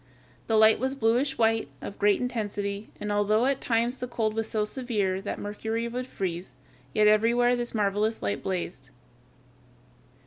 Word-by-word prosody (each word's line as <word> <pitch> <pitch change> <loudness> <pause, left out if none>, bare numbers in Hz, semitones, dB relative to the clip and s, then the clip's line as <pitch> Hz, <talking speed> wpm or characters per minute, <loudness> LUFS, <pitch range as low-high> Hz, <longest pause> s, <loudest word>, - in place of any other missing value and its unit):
The 225 - +2
light 220 0 +6
was 265 +1 -1
bluish 255 +3 +1
white, 225 -1 +2
of 200 - -8
great 205 -1 +4
intensity, 205 -4 -3
and 210 - -3
although 210 +3 +2
at 275 0 +1
times 235 +2 0
the 250 - -3
cold 225 -3 -1
was 225 0 -2
so 215 -2 0
severe 210 -6 -1
that 205 - -4
mercury 220 +3 -3
would 250 +2 -4
freeze, 180 -5 -4 0.4
yet 215 - +3
everywhere 235 +3 +4
this 240 -1 -2
marvelous 210 +1 +1
light 100 -1 -2
blazed. 185 -2 -4
220 Hz, 160 wpm, -27 LUFS, 205-240 Hz, 0.4 s, light